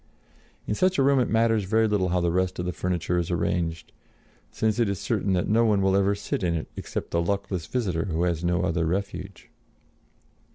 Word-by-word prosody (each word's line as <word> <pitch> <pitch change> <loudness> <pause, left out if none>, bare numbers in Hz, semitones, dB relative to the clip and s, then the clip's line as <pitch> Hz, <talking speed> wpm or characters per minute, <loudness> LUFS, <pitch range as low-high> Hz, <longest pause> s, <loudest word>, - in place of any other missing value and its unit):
In - - -1
such 185 - +2
a 135 - +4
room 140 0 +4
it 125 - +1
matters 115 -2 +2
very 110 +3 +2
little 100 -3 +1
how 90 +1 +1
the 85 -1 +1
rest 90 +1 0
of 90 - -3
the 90 - -2
furniture 90 +1 -1
is 85 - -2
arranged, 80 -2 -2 0.6
since 110 - -1
it 115 -4 +2
is 100 -1 -2
certain 100 -3 0
that 90 - 0
no 115 +2 +3
one 105 -3 +3
will 95 0 +2
ever 100 +1 +2
sit - - -3
in 85 -2 0
it 80 - -3
except - - -5
the 85 - +1
luckless 95 -2 -2
visitor 95 -10 -1
who 85 -3 -1
has 85 -2 0
no 90 +1 +1
other 85 -2 0
refuge. 95 +1 -4
95 Hz, 210 wpm, -26 LUFS, 85-105 Hz, 0.6 s, a